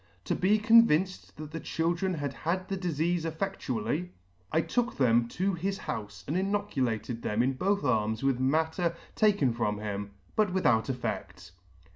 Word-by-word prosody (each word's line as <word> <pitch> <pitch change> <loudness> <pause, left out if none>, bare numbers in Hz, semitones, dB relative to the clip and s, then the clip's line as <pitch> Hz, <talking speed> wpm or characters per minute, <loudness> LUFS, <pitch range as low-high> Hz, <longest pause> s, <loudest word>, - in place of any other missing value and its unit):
To - - 0
be 200 +4 +3
convinced 210 -7 +4
that 155 0 -8
the 165 - -4
children 170 +4 -1
had 145 -3 -3
had 185 +6 -2
the 195 - -1
difeafe 175 -1 0
effedtually, 160 - -2 0.4
I 160 - +3
took 245 +7 -1
them 120 -3 +3
to 190 +10 -1
his 195 +3 -2
houfe 100 - -6
and 150 - -1
inoculated 130 - -1
them 105 +3 +1
in 130 +2 +1
both 195 +9 0
arms 110 -3 +1
with 135 -2 +2
matter 160 +5 +1 0.2
taken 200 - +3
from 105 -3 -1
him, 100 -1 -4 0.2
but 210 -4 +2
without 125 -11 +2
effect." 125 -9 -4
160 Hz, 155 wpm, -29 LUFS, 120-190 Hz, 0.4 s, convinced